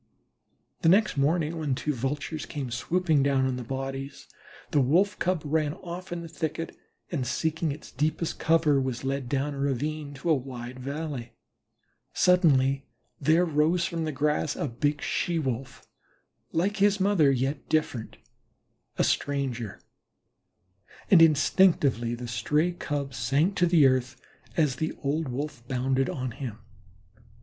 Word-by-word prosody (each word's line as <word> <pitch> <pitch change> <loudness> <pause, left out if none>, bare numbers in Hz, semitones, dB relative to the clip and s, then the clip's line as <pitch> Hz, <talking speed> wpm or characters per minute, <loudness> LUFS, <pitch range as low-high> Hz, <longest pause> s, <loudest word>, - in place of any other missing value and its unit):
The 165 - +4
next 205 +1 +4
morning 155 +3 +1
when 145 -4 0
two 150 +3 -2
Vultures 145 +4 -3
came 135 -4 -5
swooping 160 +4 +1
down 135 -1 +2
on 130 -1 0
the 125 - -5
bodies, 135 +2 -5 0.4
the 145 - +4
Wolf 180 +10 +2
cub 180 -3 0
ran 150 0 0
off 180 0 -8
in 170 -1 -4
the - - -7
thicket, 160 +1 -4 0.4
and 135 -7 -2
seeking 160 +4 -1
its 150 +2 -9
deepest 155 +4 -1
cover, 160 -4 +3
was 130 -2 -3
led 135 -2 -2
down 140 +2 -1
a 140 - -6
ravine 145 +2 -2
to 160 +5 -1
a - - +7
wide 125 -2 -5
valley. 140 -3 -5 0.8
Suddenly 140 -7 +3 0.3
there 160 +5 +4
arose 165 +2 +2
from 165 -1 -2
the 155 - -2
grass 150 +1 0
a - - -2
big 145 +4 -1
She 175 -2 0
wolf, 130 -4 -4 0.7
like 195 +6 0
his 205 0 +3
mother, 190 -7 +4
yet 135 +2 -1
different, 140 -7 -1 0.8
a - - +3
stranger, 130 -6 -1 1.3
and 180 -4 +8
instinctively 145 - +4
the 120 0 -7
stray 150 +9 +1
Cub 145 -5 -4
sank 140 - +1
to 175 - +4
the 165 -4 +5
earth, 130 -1 +1 0.4
as 150 -6 +2
the 160 +2 -2
old 150 +3 0
Wolf 140 +1 -4
bounded 130 +1 0
on 130 -2 -3
him. 115 -2 -6
145 Hz, 145 wpm, -27 LUFS, 130-160 Hz, 1.3 s, and